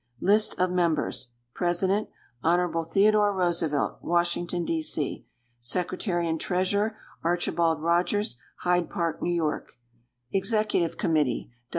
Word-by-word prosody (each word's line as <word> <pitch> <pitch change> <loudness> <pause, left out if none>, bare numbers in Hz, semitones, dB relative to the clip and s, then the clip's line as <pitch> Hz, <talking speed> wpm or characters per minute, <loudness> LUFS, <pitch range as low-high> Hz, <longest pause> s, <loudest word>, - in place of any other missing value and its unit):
List 210 +3 +3
of 180 0 +2
Members 160 -8 0 0.2
President. 185 +4 0 0.3
Hon. 170 0 +2
Theodore 205 +4 +4
Roosevelt, 170 -5 0
Washington, 175 0 0
D. 165 -1 0
C. 155 -2 -3 0.3
Secretary 175 - -1
and 160 -1 -1
Treasurer. 200 +4 0 0.3
Archibald 165 -2 +1
Rogers, 175 - +1 0.2
Hyde 180 -1 +1
Park, 170 -4 -2
N. - - -1
Y. 155 -3 0 0.7
_Executive 195 -3 +1
Committee. 150 -8 0
175 Hz, 105 wpm, -27 LUFS, 165-190 Hz, 0.7 s, Theodore